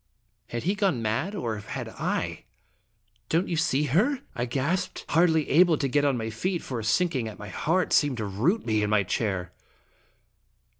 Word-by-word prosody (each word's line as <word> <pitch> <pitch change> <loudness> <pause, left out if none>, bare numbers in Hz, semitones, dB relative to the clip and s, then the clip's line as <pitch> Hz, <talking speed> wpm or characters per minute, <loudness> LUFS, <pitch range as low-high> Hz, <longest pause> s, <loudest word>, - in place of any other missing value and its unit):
Had 120 - -4
he 190 - +1
gone 190 - 0
mad, 115 - -1
or 115 - -2
had 105 - -6
I? - - -3 0.4
" 110 -1 -43
Don't 170 +4 +1
you 170 - -1
see 155 -3 +1
her?" 210 - +2
I 120 -2 -2
gasped, 165 +9 -2
hardly 160 -1 +3
able 170 +1 +5
to 140 - 0
get 145 +2 +2
on 140 -3 +2
my 110 -1 -3
feet, 175 - -2
for 125 -3 -4
a - - -5
sinking 125 +2 +1
at 110 - -8
my 105 -1 -8
heart 165 - 0
seemed 145 -4 +3
to 110 - -2
root 120 - 0
me 110 -2 +1
to 105 - +1
my 105 -1 +3
chair. 95 -3 -2
135 Hz, 190 wpm, -27 LUFS, 110-175 Hz, 0.4 s, able